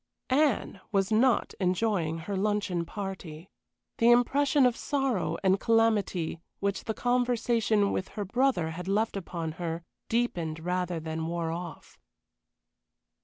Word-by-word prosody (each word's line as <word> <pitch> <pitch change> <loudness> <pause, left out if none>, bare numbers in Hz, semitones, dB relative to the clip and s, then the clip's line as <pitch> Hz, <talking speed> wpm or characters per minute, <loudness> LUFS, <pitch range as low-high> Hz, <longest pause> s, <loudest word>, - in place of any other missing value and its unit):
Anne 265 -8 +2
was 195 -1 +1
not 235 +3 +3
enjoying 180 -3 +1
her 175 +5 -4
luncheon 195 -3 0
party. 190 -3 -7 0.5
The 230 - +5
impression 270 +3 +4
of 245 -2 +3
sorrow 270 -10 -1
and 190 0 +3
calamity 215 -8 +1 0.2
which 200 -1 -2
the 220 - -2
conversation 240 -4 +1
with 185 - -2
her 205 - -1
brother 230 -6 +1
had 180 +3 -7
left 210 +3 +1
upon 170 -4 -4
her 165 0 -3 0.3
deepened 175 -10 0
rather 180 0 -1
than 160 0 -4
wore 170 -1 -2
off. 170 -2 -7
195 Hz, 125 wpm, -29 LUFS, 170-230 Hz, 0.5 s, The